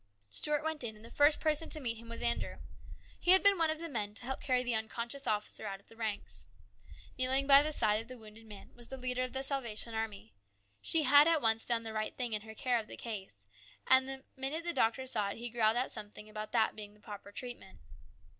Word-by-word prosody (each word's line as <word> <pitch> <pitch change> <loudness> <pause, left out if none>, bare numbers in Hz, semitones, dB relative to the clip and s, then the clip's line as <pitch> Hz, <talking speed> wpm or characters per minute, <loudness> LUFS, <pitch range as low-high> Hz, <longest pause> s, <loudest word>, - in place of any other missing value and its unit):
Stuart 295 - +1
went 315 -3 -2
in, 220 -2 -4
and 215 +1 -14
the 230 - -12
first 290 +1 +4
person 310 0 0
to 310 - -1
meet 235 -5 -2
him 230 +1 -12
was 230 - -6
Andrew. 235 0 0 0.6
He 355 - +6
had 380 - +7
been 400 -2 +5
one 325 -1 +3
of 315 - 0
the 335 +1 -5
men 210 -8 -3
to - - -4
help 265 +1 -4
carry 255 -2 +1
the 245 -1 0
unconscious 235 +5 -3
officer 210 0 -2
out 195 -1 -5
of 200 - -25
the 225 - -15
ranks. 220 -3 -5 0.7
Kneeling 260 +2 +3
by 275 0 +9
the 305 +1 0
side 215 -6 +2
of 225 - -12
the 255 0 -9
wounded 220 0 -14
man 205 -2 -12
was 240 -1 -11
the 265 - -7
leader 255 0 -2
of 255 0 -2
the 265 0 -2
Salvation 240 -5 -3
Army. 215 - -4 0.5
She 325 -1 +3
had 290 +2 +7
at 330 -1 +4
once 225 -3 +3
done 235 -1 +1
the 220 -1 -5
right 215 0 -3
thing 245 -3 -2
in 210 - 0
her 220 +1 -11
care 245 +1 +1
of 215 - -7
the - - -9
case, 190 - -7 0.4
and 260 0 +5
the 265 0 -6
minute 275 +5 -3
the 345 0 -1
doctor 245 +1 +1
saw 215 -6 -1
it - - -6
he 240 0 -6
growled 225 -1 +3
out 255 - 0
something 210 0 -8
about 215 0 -7
that 225 -2 +2
being 210 -1 -8
the - - -22
proper 205 -1 -10
treatment. 240 -4 -8
235 Hz, 245 wpm, -33 LUFS, 215-270 Hz, 0.7 s, by